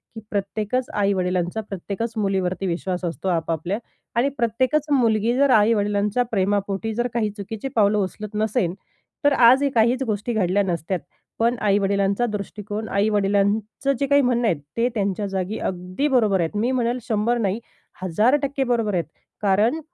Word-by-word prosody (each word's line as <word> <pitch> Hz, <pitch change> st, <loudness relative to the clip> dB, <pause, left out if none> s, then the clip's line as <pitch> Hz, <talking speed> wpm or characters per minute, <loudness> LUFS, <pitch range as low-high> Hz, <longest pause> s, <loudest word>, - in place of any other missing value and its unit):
की -, -, -5 dB
प्रत्येकच 210 Hz, +5 st, -2 dB
आई-वडिलांचा 185 Hz, -1 st, 0 dB
प्रत्येकच 200 Hz, +4 st, -4 dB
मुलीवरती 195 Hz, -2 st, 0 dB
विश्वास 180 Hz, +1 st, -2 dB
असतो 170 Hz, +2 st, -4 dB
आपापल्या 165 Hz, +2 st, -1 dB, 0.4 s
आणि 255 Hz, +4 st, +3 dB
प्रत्येकच 255 Hz, +6 st, +1 dB
मुलगी 230 Hz, -4 st, +3 dB
जर 280 Hz, +1 st, +4 dB
आई-वडिलांच्या 210 Hz, 0 st, +3 dB
प्रेमापोटी 200 Hz, +1 st, 0 dB
जर 240 Hz, +2 st, 0 dB
काही 225 Hz, -3 st, 0 dB
चुकीची 210 Hz, +5 st, -5 dB
पावलं 210 Hz, -1 st, +4 dB
उचलत 210 Hz, +2 st, -3 dB
नसेल, 215 Hz, -4 st, 0 dB, 0.5 s
तर 290 Hz, -, +5 dB
आजही 260 Hz, +3 st, +5 dB
काहीच 235 Hz, +3 st, +3 dB
गोष्टी 215 Hz, 0 st, -2 dB
घडल्या 200 Hz, -1 st, +2 dB
नसत्यात. 175 Hz, 0 st, -2 dB, 0.4 s
पण 235 Hz, +2 st, +2 dB
आई-वडिलांचा 200 Hz, +1 st, +2 dB
दृष्टिकोन, 210 Hz, 0 st, -5 dB
आई-वडिलांचं 205 Hz, +5 st, +1 dB
जे 280 Hz, -, +1 dB
काही 285 Hz, +1 st, +5 dB
म्हणणं 245 Hz, -2 st, +1 dB
आहेत, 165 Hz, -8 st, 0 dB, 0.2 s
ते 235 Hz, +1 st, +3 dB
त्यांच्या 200 Hz, -1 st, -1 dB
जागी 195 Hz, +2 st, -3 dB
अगदी 185 Hz, +9 st, -2 dB
बरोबर 220 Hz, -8 st, +3 dB
आहेत. 165 Hz, +3 st, -1 dB
मी 230 Hz, +5 st, +1 dB
म्हणेल 245 Hz, -1 st, 0 dB
100 225 Hz, +2 st, +1 dB
नाही, 205 Hz, -2 st, 0 dB, 0.4 s
1,000% 270 Hz, -, +2 dB
बरोबर 235 Hz, -5 st, 0 dB
आहेत 175 Hz, -2 st, 0 dB, 0.4 s
कारण 210 Hz, +8 st, +2 dB
210 Hz, 145 wpm, -23 LUFS, 195-235 Hz, 0.5 s, तर